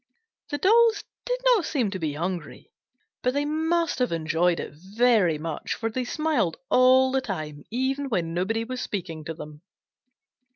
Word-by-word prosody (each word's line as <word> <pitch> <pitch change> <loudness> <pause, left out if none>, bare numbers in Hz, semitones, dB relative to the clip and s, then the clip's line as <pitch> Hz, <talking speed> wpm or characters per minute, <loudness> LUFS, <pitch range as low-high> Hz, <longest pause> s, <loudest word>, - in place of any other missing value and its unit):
The 290 - -2
dolls 445 +4 +4 0.2
did - - 0
not 485 -7 +5
seem 255 -10 0
to 190 - -4
be 155 -3 -2
hungry, 170 0 -5 0.5
but 250 +1 0
they 285 0 +1
must 320 +1 0
have 250 - +1
enjoyed 165 +1 +1
it - - -6
very 195 0 +2
much, 155 0 -4
for 225 -1 -3
they 255 +2 -2
smiled 300 - 0
all 260 +1 +5
the 265 0 +1
time, 155 - -6
even 270 +4 -1
when 170 -7 -1
nobody 210 +6 0
was 255 +2 -5
speaking 165 -6 -4
to 165 -1 -5
them. 150 -1 -10
225 Hz, 165 wpm, -25 LUFS, 165-275 Hz, 0.5 s, not